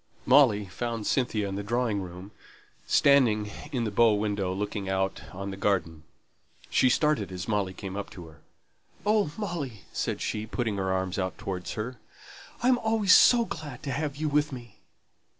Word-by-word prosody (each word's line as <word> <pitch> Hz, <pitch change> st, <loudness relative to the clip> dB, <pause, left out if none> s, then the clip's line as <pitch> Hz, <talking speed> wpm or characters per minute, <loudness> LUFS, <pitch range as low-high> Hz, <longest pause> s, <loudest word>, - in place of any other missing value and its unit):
Molly 125 Hz, -7 st, +5 dB
found 115 Hz, +3 st, -4 dB
Cynthia 115 Hz, -6 st, 0 dB
in 95 Hz, 0 st, -4 dB
the -, -, -2 dB
drawing 115 Hz, -2 st, 0 dB
room, 90 Hz, +2 st, -9 dB, 0.6 s
standing 115 Hz, -7 st, +4 dB, 0.2 s
in 125 Hz, -5 st, -1 dB
the 110 Hz, -, -2 dB
bow 110 Hz, +1 st, +4 dB
window, 100 Hz, -3 st, -1 dB
looking 100 Hz, 0 st, -3 dB
out 95 Hz, 0 st, -1 dB
on 100 Hz, +1 st, -5 dB
the -, -, -5 dB
garden. 90 Hz, -6 st, 0 dB, 0.7 s
She 130 Hz, -, +4 dB
started 150 Hz, -, +1 dB
as 90 Hz, -1 st, -5 dB
Molly 100 Hz, -4 st, -1 dB
came 95 Hz, -1 st, -6 dB
up 100 Hz, -, -5 dB
to 90 Hz, -, -8 dB
her. 75 Hz, -2 st, -16 dB, 0.6 s
"Oh, 210 Hz, -6 st, +2 dB
Molly," 160 Hz, -, -4 dB
said -, -, -2 dB
she, 110 Hz, 0 st, -3 dB
putting 110 Hz, -2 st, -2 dB
her 95 Hz, -1 st, -1 dB
arms 95 Hz, 0 st, -1 dB
out 95 Hz, -1 st, -2 dB
towards 95 Hz, -4 st, -5 dB
her, 120 Hz, +3 st, -5 dB, 0.6 s
"I -, -, +3 dB
am 255 Hz, -1 st, +4 dB
always 220 Hz, -4 st, +3 dB
so 240 Hz, -2 st, +7 dB
glad 145 Hz, -, -7 dB
to 140 Hz, -, -3 dB
have 145 Hz, +2 st, -2 dB
you 155 Hz, +1 st, -1 dB
with 150 Hz, +1 st, +1 dB
me!" 120 Hz, -5 st, -10 dB
110 Hz, 175 wpm, -28 LUFS, 95-140 Hz, 0.7 s, so